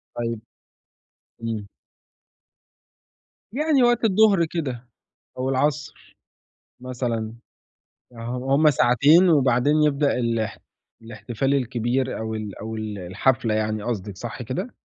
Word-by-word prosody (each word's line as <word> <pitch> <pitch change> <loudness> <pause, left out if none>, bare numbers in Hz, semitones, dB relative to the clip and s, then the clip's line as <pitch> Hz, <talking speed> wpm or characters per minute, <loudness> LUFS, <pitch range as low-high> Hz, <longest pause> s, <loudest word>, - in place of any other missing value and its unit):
طيب. 115 -2 -3 1.0
إمم. 110 -3 -3 1.9
يعني 290 0 +2
وقت 240 -1 +3
الضُّهر 200 -4 +4
كده 130 -7 -4 0.5
أو 130 +1 -1
العصر 145 +2 -2 0.7
مثلًا، 120 -3 -3 0.8
أها 115 0 -7
وهُم 140 +4 +3
ساعتين 145 +8 +5
وبعدين 145 +1 +3
يبدأ 145 -1 +2
الح 115 -2 -1 0.4
الإحتفال 120 +3 -3
الكبير 125 0 -1
أو 110 0 -4
ال 105 -3 -6
أو 110 +1 -5
ال 110 -2 -5
الحفلة 115 +6 0
يعني 110 -1 -1
قصدِك، 100 -5 -4
صح 120 +2 -6
كده؟ 130 - -5
125 Hz, 105 wpm, -23 LUFS, 110-145 Hz, 1.9 s, ساعتين